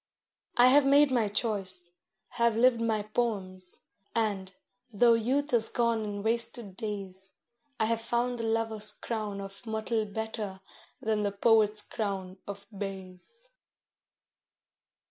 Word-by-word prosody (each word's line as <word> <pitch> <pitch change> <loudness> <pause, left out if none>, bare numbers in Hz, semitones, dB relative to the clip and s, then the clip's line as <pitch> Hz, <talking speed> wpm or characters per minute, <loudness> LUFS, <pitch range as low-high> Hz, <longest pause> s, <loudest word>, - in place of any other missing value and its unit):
I 245 +1 +8
have 285 +2 +6
made 280 +1 +5
my 235 -4 +2
choice, 195 -5 -1 0.4
have 235 -2 +1
lived 235 0 +4
my 220 -2 0
poems, 195 -5 -2 0.3
and, 200 -4 -1 0.4
though 230 +2 +5
youth 265 +6 0
is 225 -2 +3
gone 235 -2 +1
in 205 -1 -4
wasted 230 -2 +1
days, 195 -3 -4 0.5
I 220 - +3
have 225 0 0
found 240 +1 -1
the - - -2
lover's 225 -1 0
crown 215 -4 -4
of 195 +3 -8
myrtle 220 0 -1
better 210 -2 -5 0.4
than 220 -1 +1
the 205 -1 0
poet's 215 0 +4
crown 195 -4 -4
of 200 0 -7
bays. 195 - -8
220 Hz, 125 wpm, -29 LUFS, 200-235 Hz, 0.5 s, I